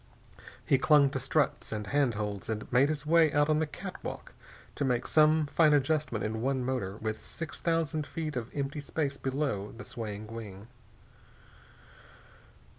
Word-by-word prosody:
He 135 - +3
clung 145 -2 +5
to 135 - -2
struts 140 +3 0
and 105 -1 -3
handholds 105 -6 -1
and 110 -1 -2
made 130 +4 +5
his 150 -2 -3
way 160 0 +5
out 145 +1 +2
on 155 0 +3
the 160 - 0
catwalk 150 - -7 0.4
to - - -2
make 125 -3 +1
some 155 0 +4
fine 150 +1 +4
adjustment 145 -4 0
in 110 +1 -2
one 130 0 0
motor, 120 -7 -2
with 110 0 -4
six 165 -1 -7
thousand 160 -3 0
feet 155 -3 -4
of 120 -2 -3
empty 145 +1 -2
space 140 -1 -2
below 130 -8 -2
the 125 - -8
swaying 110 -2 -6
wing. 105 -1 -8
135 Hz, 155 wpm, -30 LUFS, 115-150 Hz, 0.4 s, clung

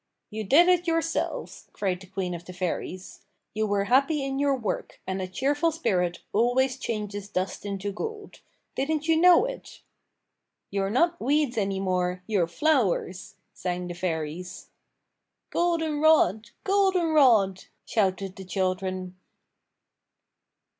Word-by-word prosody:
"You 215 +1 -4
did 295 - +5
it 355 -1 +3
yourselves," 330 0 -2
cried 185 -3 -1
the 190 - -12
queen 185 -1 -3
of 170 0 -7
the 180 - -9
fairies. 180 0 -4 0.3
"You 215 0 0
were 200 -1 +1
happy 275 +6 +2
in 270 0 -2
your 280 -1 +2
work, 230 -6 -4
and 190 0 -3
a 185 - -3
cheerful 285 - 0
spirit 185 - -1
always 250 +4 +2
changes 205 -4 -4
dust 190 +1 -3
into 200 0 -3
gold. 425 - -7 0.3
Didn't 305 +3 -1
you 325 - +4
know 355 +6 +6
it?" - - -8 0.9
"You're 195 -1 0
not 340 - +1
weeds 285 -1 +1
any 195 -3 -1
more, 180 -1 -1
you're 195 -6 +1
flowers," 190 - 0 0.2
sang 180 0 -3
the 175 - -5
fairies. 170 0 -4 0.8
"Golden 325 -3 0
rod, 225 - +4
golden 380 -3 +2
rod!" 225 -11 +4 0.2
shouted 195 -2 -1
the 190 - -7
children. 185 0 -2
210 Hz, 135 wpm, -26 LUFS, 185-300 Hz, 0.9 s, know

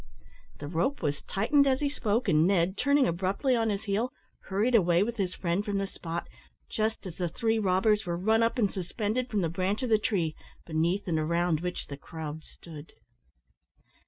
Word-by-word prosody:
The 145 - -7
rope 170 - -1
was 145 -2 -1
tightened 280 +8 +2
as 260 -1 +2
he 290 - +1
spoke, 230 -5 -1
and 160 -2 +4
Ned, 190 -1 +2
turning 280 +4 +3
abruptly 190 - 0
on 225 -1 +1
his 205 0 -2
heel, 220 +4 -1 0.3
hurried 210 +6 0
away 180 -4 +4
with 235 +2 -3
his 185 -3 -1
friend 175 +2 -1
from 205 -2 -2
the 195 - 0
spot 170 -3 -5 0.4
just 220 0 -1
as 180 -3 -7
the 175 -2 -1
three 225 +5 0
robbers 210 +2 +2
were 170 0 -1
run 220 +5 +2
up 230 +3 +1
and 210 -5 +1
suspended 215 +6 -2
from 210 -3 0
the 170 - +1
branch 185 +7 -1
of 250 - -1
the 220 -1 +4
tree, 175 -8 0 0.3
beneath 170 +5 0
and 165 -3 +1
around 170 +1 +1
which 180 +1 -4
the 140 - -8
crowd 155 +1 -7
stood. 155 -1 -12
195 Hz, 190 wpm, -29 LUFS, 170-225 Hz, 0.4 s, and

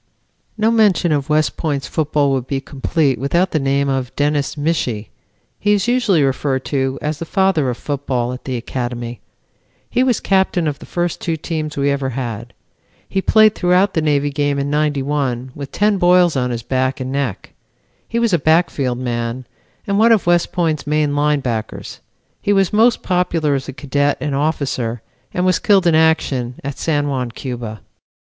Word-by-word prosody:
"No 220 +1 +2
mention 205 -6 +3
of 145 -2 0
West 150 0 +1
Point's 145 -5 -2
football 150 -2 +1
would 130 -2 -1
be 135 - -1
complete 140 +1 -1
without 170 +7 +1
the 155 - +1
name 140 0 +1
of 130 -2 -2
Dennis 145 0 0
Michie. 145 -8 -1 0.5
He 205 0 +2
is 205 +1 +1
usually 235 - +3
referred 135 0 -1
to 135 -2 0
as 150 0 -2
the 165 - -4
Father 190 -7 +1
of 120 - -3
Football 130 -4 -2
at 125 - -9
the 130 -2 -2
Academy. 120 -1 -5 0.7
He 250 - +2
was 250 -4 +2
captain 190 -3 +1
of 145 -2 -3
the - - -12
first 175 -1 -2
two 165 -2 -1
teams 155 -1 -4
we 140 0 +2
ever 140 -1 -1
had. 120 -2 -5 0.5
He 195 - -1
played 215 +1 +5
throughout 180 +1 +2
the 160 - +1
Navy 145 -1 +1
game 145 0 0
in 140 +1 -2
'91 140 -4 -1
with 140 -1 -8
ten 205 -1 +1
boils 175 -2 +4
on 125 -2 0
his 120 -2 -4
back 130 +2 -1
and 130 0 -4
neck. 140 -3 -3 0.5
He 230 - -3
was 235 -4 +1
a 175 - +4
backfield 145 -5 +1
man 120 0 -3 0.4
and 200 0 0
one 230 +2 +5
of 220 -4 +3
West 175 0 +2
Point's 160 -5 -1
main 150 -1 +1
line 150 0 +2
backers. 115 -4 -4 0.4
He 205 - +1
was 195 -2 +2
most 225 +2 +3
popular 175 -5 +1
as 135 -1 -2
a - - -5
cadet 145 +1 0
and 150 -2 -2
officer 135 -6 -1 0.3
and 180 - -1
was 185 -2 +2
killed 195 -3 +3
in 170 - +4
action 150 -6 +2
at 140 0 -5
San 145 -3 0
Juan, 130 -3 -2
Cuba. 120 -3 -6
145 Hz, 180 wpm, -18 LUFS, 130-175 Hz, 0.7 s, played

